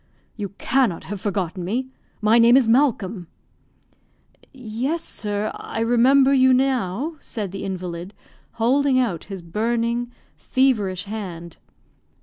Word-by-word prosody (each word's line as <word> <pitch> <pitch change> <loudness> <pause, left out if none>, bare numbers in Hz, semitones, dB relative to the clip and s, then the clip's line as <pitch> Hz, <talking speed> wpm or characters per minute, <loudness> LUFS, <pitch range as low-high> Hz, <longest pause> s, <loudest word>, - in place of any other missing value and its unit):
"You 205 -3 -4
cannot 240 -9 +1
have 200 -1 -6
forgotten 185 -3 -2
me 245 +8 -2 0.3
my 220 +2 +4
name 235 +2 +7
is 260 -4 +3
Malcolm." 225 - +1 1.2
"Yes, 260 +6 -3
sir; 210 0 -3
I - - -6
remember 260 +4 +4
you 260 -1 +5
now," 260 - 0
said 210 -9 -5
the 195 - -6
invalid 180 0 -5 0.4
holding 260 +4 +2
out 225 -11 0
his 195 -3 -8
burning, 235 +6 -1 0.2
feverish 210 -9 +1
hand. 185 -6 -7
225 Hz, 120 wpm, -22 LUFS, 195-255 Hz, 1.2 s, name